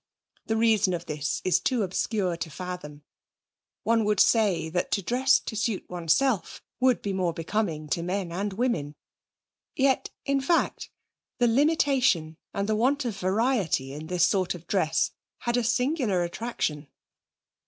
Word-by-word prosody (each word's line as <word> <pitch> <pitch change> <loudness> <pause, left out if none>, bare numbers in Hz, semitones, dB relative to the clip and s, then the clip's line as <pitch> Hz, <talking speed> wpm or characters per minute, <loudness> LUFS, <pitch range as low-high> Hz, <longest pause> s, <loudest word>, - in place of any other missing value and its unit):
The 220 - 0
reason 215 -5 +3
of 170 0 -6
this 150 -2 -3
is 185 - +3
too 250 -5 0
obscure 190 -1 -1
to 165 -1 -5
fathom. 155 -3 -7 0.8
One 225 0 +2
would 210 -1 +1
say 205 -8 +3
that 175 +2 -2
to 200 - 0
dress 255 +7 +3
to 220 - -6
suit 215 -1 -1
oneself 180 - +1 0.2
would 255 -1 +3
be 200 - -2
more 180 -3 0
becoming 165 -2 -2
to 170 - 0
men 180 0 -2
and 200 +4 -2
women. 190 - -1 0.8
Yet, 270 -1 +2 0.2
in 275 0 +1
fact, 335 +5 0 0.5
the 245 - +3
limitation 255 - +2
and 200 0 -2
the 215 - +1
want 265 +5 +1
of 230 -4 -2
variety 190 - 0
in 155 +2 -7
this 180 0 +3
sort 185 -2 +1
of 175 -1 -11
dress 165 -4 +1 0.3
had 240 0 -1
a 245 - +1
singular 245 - +1
attraction. 170 -6 -3
200 Hz, 155 wpm, -27 LUFS, 170-240 Hz, 0.8 s, reason